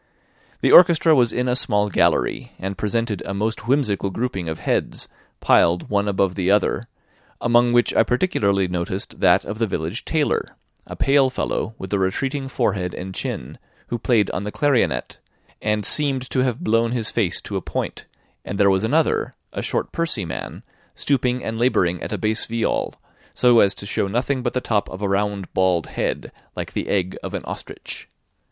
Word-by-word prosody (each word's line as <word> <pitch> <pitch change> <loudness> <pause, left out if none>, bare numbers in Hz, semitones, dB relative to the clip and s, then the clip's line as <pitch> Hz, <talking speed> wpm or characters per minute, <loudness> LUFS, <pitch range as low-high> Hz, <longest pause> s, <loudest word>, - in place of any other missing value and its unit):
The - - +3
orchestra 165 -2 +7
was 120 -5 +4
in 125 +1 -1
a 125 - +1
small 105 -4 +1
gallery, 100 - +1
and 95 +1 -4
presented 105 0 -1
a 100 - -4
most 110 +3 -2
whimsical 115 -8 +1
grouping 95 -5 -3
of 80 - -4
heads, - - -2 0.3
piled 85 +4 +3
one 100 0 +1
above 95 -2 +1
the 95 -1 -1
other, 105 +3 +2 0.5
among 120 0 +3
which 120 0 +3
I - - +5
particularly 105 - +1
noticed 90 +2 -3
that 90 0 +4
of 105 +2 -5
the 115 - +1
village 85 +4 -3
tailor, 155 -3 -1 0.3
a - - -7
pale 135 -1 +3
fellow 115 -3 -3
with 95 +1 -6
a 100 - +2
retreating 135 +9 -1
forehead 90 -8 -1
and 95 +1 -6
chin, - - -5 0.3
who 120 - -2
played 110 -3 +2
on 90 - -3
the 105 - -4
clarionet, 140 -2 0 0.4
and 105 -1 0
seemed 135 +1 +2
to - - +1
have 125 -2 0
blown 115 +2 +2
his 115 -3 -1
face 105 -7 +1
to - - -6
a - - -1
point; - - -4 0.4
and 100 - -5
there 100 -1 +5
was 95 +1 +1
another, 150 +8 +1 0.2
a - - -3
short - - -2
pursy 165 - -1
man, 80 - -6 0.3
stooping 125 -2 0
and 110 0 -4
labouring 90 -8 +2
at - - -5
a - - -1
bass 110 0 0
viol, 115 0 -1 0.4
so 120 -2 +5
as 100 -2 +4
to - - -7
show 100 - -1
nothing 125 +6 -1
but 120 -1 -2
the 125 - -1
top 105 -4 0
of 95 +2 -7
a - - +1
round 100 -1 -1
bald 90 -3 +2
head, - - -3 0.2
like - - -5
the - - -3
egg 95 -2 0
of - - -5
an - - -4
ostrich. - - -7
110 Hz, 185 wpm, -22 LUFS, 95-125 Hz, 0.5 s, orchestra